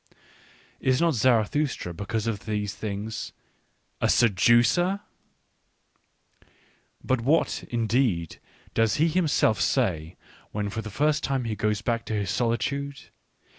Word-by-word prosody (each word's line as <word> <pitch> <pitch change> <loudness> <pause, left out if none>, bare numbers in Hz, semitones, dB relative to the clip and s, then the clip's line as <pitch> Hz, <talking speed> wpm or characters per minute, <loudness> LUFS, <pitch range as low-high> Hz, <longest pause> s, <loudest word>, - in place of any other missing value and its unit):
Is 130 -1 +2
not 170 -1 +3
Zarathustra, 120 - +1
because 100 +5 -3
of 110 -3 -3
these 105 -2 -2
things, 105 +1 -5 0.7
a - - +2
seducer 120 - +3 1.4
1... - - -28 0.5
But 130 -2 0
what, 145 +7 +1
indeed, 115 - 0 0.3
does 115 -1 +2
he 160 +3 +3
himself 155 - +2
say, 80 -2 0 0.3
when 105 -1 -3
for 110 - -3
the 110 - -7
first 150 +7 +1
time 135 -2 0
he 115 -2 -3
goes 105 +1 -1
back 115 -2 -1
to 110 - -2
his 100 -4 -1
solitude? 140 +4 -2
115 Hz, 125 wpm, -26 LUFS, 105-135 Hz, 1.4 s, not